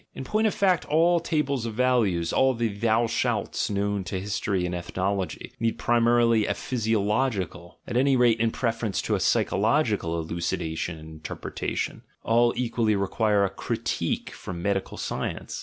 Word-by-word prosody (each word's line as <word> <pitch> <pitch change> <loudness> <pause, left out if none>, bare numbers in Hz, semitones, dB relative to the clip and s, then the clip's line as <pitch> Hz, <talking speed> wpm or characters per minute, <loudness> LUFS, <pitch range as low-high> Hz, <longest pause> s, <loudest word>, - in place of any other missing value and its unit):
In - - -5
point 215 +10 +1
of 210 - 0
fact, 185 -4 +2
all 170 +3 +3
tables 140 -7 -1
of 110 - -5
values, 110 -9 +2
all 130 -1 +3
the 115 -1 0
"thou 110 +3 +1
shalts" 115 - -1
known 100 -1 -1
to 95 - -3
history 95 -1 -1
and 90 - -3
ethnology, 95 +2 -3
need 115 0 0
primarily 115 -2 +3
a - - 0
physiological, 105 -5 -1
at - - -5
any 135 +2 +4
rate 120 -3 +4
in 115 0 +2
preference 115 -3 -1
to - - -1
a - - +1
psychological, 105 - +1
elucidation 80 0 -3
and 80 0 -11
interpretation: 80 0 -4 0.2
all 120 +1 +4
equally 115 -3 +1
require 100 +1 +2
a - - -1
critique - - -2
from 85 -2 -7
medical 100 -1 -1
science. - - -4
110 Hz, 155 wpm, -26 LUFS, 95-120 Hz, 0.2 s, any